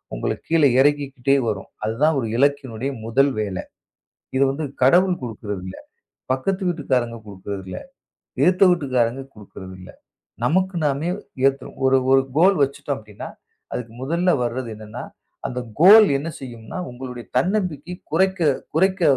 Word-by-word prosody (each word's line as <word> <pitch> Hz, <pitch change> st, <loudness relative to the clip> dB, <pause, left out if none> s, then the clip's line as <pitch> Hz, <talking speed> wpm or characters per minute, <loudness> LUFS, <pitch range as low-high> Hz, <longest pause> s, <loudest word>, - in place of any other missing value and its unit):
உங்களைக் -, -, -3 dB
கீழே 160 Hz, -3 st, +4 dB
இறக்கிக்கிட்டே 140 Hz, -1 st, +2 dB
வரும். 100 Hz, -3 st, -3 dB, 0.2 s
அதுதான் 140 Hz, +8 st, +2 dB
ஒரு 115 Hz, -, -2 dB
இலக்கினுடைய 135 Hz, -2 st, 0 dB
முதல் 135 Hz, +5 st, +3 dB
வேலை. 100 Hz, -3 st, -3 dB, 0.7 s
இது 135 Hz, -, +3 dB
வந்து 150 Hz, +3 st, -3 dB, 0.2 s
கடவுள் 180 Hz, +6 st, +4 dB
கொடுக்கறது 105 Hz, -5 st, -5 dB
இல்ல, 95 Hz, -, -7 dB, 0.6 s
பக்கத்து 190 Hz, +9 st, -1 dB
வீட்டுக்காரங்க 130 Hz, -8 st, -1 dB
கொடுக்கறது 100 Hz, 0 st, -7 dB
இல்ல, 95 Hz, -, -6 dB, 0.6 s
எதிர்த்த 185 Hz, +2 st, +5 dB
வீட்டுக்காரங்க 130 Hz, -6 st, 0 dB
கொடுக்கறது 95 Hz, -2 st, -11 dB
இல்ல. 90 Hz, -, -11 dB, 0.6 s
நமக்கு 185 Hz, +4 st, +1 dB
நாமே 145 Hz, +4 st, -1 dB, 0.4 s
ஏத்துறோம். 135 Hz, 0 st, -2 dB
ஒரு 135 Hz, 0 st, +5 dB, 0.2 s
ஒரு 135 Hz, 0 st, +6 dB, 0.2 s
கோல் 190 Hz, +4 st, +5 dB
வச்சுட்டோம் 140 Hz, 0 st, -4 dB
அப்படின்னா, 105 Hz, -2 st, -9 dB, 0.4 s
அதுக்கு 120 Hz, -2 st, -5 dB
முதல்ல 170 Hz, +6 st, +1 dB
வர்றது 120 Hz, +1 st, -3 dB
என்னான்னா? 110 Hz, 0 st, -8 dB, 0.4 s
அந்த 125 Hz, -, -4 dB, 0.2 s
கோல் 210 Hz, +5 st, +9 dB
என்ன 150 Hz, +4 st, -4 dB
செய்யும்னா, 120 Hz, +3 st, -8 dB
உங்களுடைய 125 Hz, -1 st, -8 dB
தன்னம்பிக்கை 180 Hz, -1 st, -1 dB, 0.2 s
குறைக்க 190 Hz, +2 st, +2 dB, 0.3 s
குறைக்க 185 Hz, +2 st, +2 dB
135 Hz, 130 wpm, -22 LUFS, 115-165 Hz, 0.7 s, கோல்